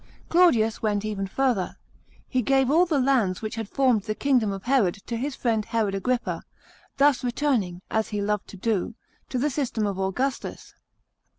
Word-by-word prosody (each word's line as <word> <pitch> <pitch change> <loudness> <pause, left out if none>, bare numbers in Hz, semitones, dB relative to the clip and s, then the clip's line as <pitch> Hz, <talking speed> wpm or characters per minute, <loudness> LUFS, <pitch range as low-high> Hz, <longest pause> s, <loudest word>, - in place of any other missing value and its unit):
Claudius 240 -11 +4
went 210 -1 0
even 200 -2 -2
further. 240 -4 0 0.5
He 255 - 0
gave 270 +2 +2
all 345 +4 +4
the 315 -4 +1
lands 245 -8 +1
which 215 - -3
had 225 -2 -5
formed 255 -6 +2
the 215 +1 -4
kingdom 250 -7 +2
of 195 0 -6
Herod 245 -9 +2
to 235 - -3
his 265 +4 -3
friend 225 -3 0
Herod 215 -2 -1
Agrippa, 245 +5 -1 0.6
thus 280 -2 +4
returning, 240 -9 0
as 220 0 +1
he 210 - -2
loved 210 0 -1
to 195 - -11
do, 215 +1 -1 0.3
to 255 - -2
the 285 +4 +1
system 245 -6 -1
of 200 -2 -2
Augustus. 250 +8 -3
230 Hz, 175 wpm, -25 LUFS, 205-270 Hz, 0.6 s, Claudius